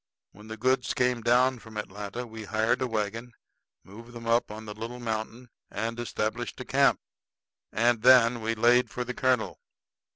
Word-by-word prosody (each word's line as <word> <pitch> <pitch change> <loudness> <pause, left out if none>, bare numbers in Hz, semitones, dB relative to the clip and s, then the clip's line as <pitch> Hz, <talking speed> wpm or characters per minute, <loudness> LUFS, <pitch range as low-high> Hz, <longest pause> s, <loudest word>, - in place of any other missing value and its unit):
When 105 +3 -15
the 110 0 -7
goods 130 +2 +1
came 125 -1 +1
down 125 +2 +3
from 110 -1 -11
Atlanta, 105 +3 -5
we 110 -2 -9
hired 110 +5 0
a 130 - +1
wagon, 115 +2 -3 0.5
moved 115 +5 -13
them 120 -1 -9
up 115 +1 +2
on 110 +1 -8
the 105 - -7
little 115 +3 -7
mountain, 115 +1 -5 0.2
and 115 +1 -4
established 120 0 -3
camp. - - +3 0.7
And 120 0 +2
then 120 -1 +6
we 115 +1 -1
laid 120 +3 +4
for 125 - -4
the 125 +1 -5
colonel. 130 -2 0
115 Hz, 165 wpm, -27 LUFS, 110-125 Hz, 0.7 s, then